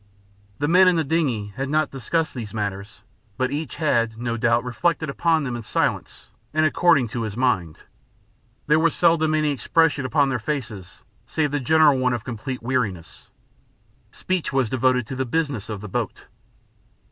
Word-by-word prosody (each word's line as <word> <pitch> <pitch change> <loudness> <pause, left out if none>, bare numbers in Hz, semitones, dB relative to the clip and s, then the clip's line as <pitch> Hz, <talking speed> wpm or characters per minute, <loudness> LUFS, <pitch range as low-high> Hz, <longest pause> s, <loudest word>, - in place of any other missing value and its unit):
The 145 - -1
men 185 +4 +6
in 180 - +4
the 165 - +1
dingey 130 -10 -1
had 135 0 -3
not 155 +1 +1
discussed 155 +5 -1
these 110 -5 -6
matters, 100 -1 -5 0.3
but 130 0 0
each 145 0 -4
had, 115 -8 0
no 120 0 -2
doubt, 115 0 +2
reflected 155 +4 -1
upon 160 +1 +1
them 125 -3 -3
in 120 - -5
silence 110 - -2 0.2
and 155 0 +3
according 155 -6 +3
to 115 - -4
his 110 -1 -4
mind. 95 -11 0 0.8
There 150 +2 +3
was 165 0 +2
seldom 160 -2 +3
any 155 -1 +1
expression 145 +3 +1
upon 140 +2 +2
their 130 -2 -1
faces 105 -9 -5 0.2
save 150 +3 -1
the 145 - 0
general 150 +1 +4
one 125 -1 +1
of 120 -3 -3
complete 125 +1 -6
weariness. 110 - -3 0.8
Speech 185 -3 -3
was 135 -5 0
devoted 130 -1 +2
to 130 - -6
the 130 - -1
business 130 -5 -2
of 105 -3 -5
the 105 - -7
boat. 95 - -4
130 Hz, 170 wpm, -23 LUFS, 115-155 Hz, 0.8 s, men